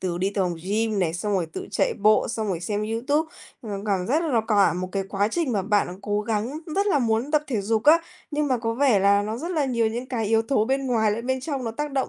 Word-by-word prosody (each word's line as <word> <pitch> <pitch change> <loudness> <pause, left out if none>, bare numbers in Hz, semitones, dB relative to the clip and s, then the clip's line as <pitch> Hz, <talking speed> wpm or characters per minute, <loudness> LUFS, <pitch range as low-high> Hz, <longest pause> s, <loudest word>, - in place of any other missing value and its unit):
từ 175 -2 -2
đi 190 +2 0
từ 200 - 0
tòng 175 -1 -1
gym 215 +2 0
này, 170 -3 0
xong 205 +4 -2
rồi 185 -4 0
tự 160 - -7
chạy - - +1
bộ, 215 +1 +3
xong 220 -1 -2
rồi 180 -4 -2
xem 205 +4 -2
YouTube 255 +9 0 0.3
mà 220 - -7 0.2
cảm 190 -3 0
giác 300 +7 +1
là 260 -8 +2
cả 205 -3 +4
một 180 +1 -3
cái 195 - 0
quá 200 +1 0
trình 310 0 -1
mà 200 -3 0
bạn 205 +1 +2
đã 180 - -7
cố 205 0 -1
gắng, 225 +6 -2 0.2
rất 400 +1 +2
là 380 -8 +3
muốn 230 +2 0
tập 300 -1 +2
thể 235 -6 -1
dục 215 +2 0
á, 315 +3 +7 0.3
nhưng 300 0 0
mà 255 -2 +1
có 230 0 -2
vẻ 255 -4 +3
là 200 +1 +4
nó 215 +2 -3
rất 330 +8 -5
là 315 -5 +1
nhiều 235 -4 +1
những 240 +3 -3
cái 235 -4 -2
yếu 225 +1 +3
tố 225 -2 +1
bên 270 +3 -1
ngoài 225 -4 +2
lẫn 230 +3 -4
bên 260 0 0
trong 270 -1 -4
nó 230 - -2
tác 295 +5 -4
động, 270 -1 0
225 Hz, 285 wpm, -24 LUFS, 205-265 Hz, 0.3 s, á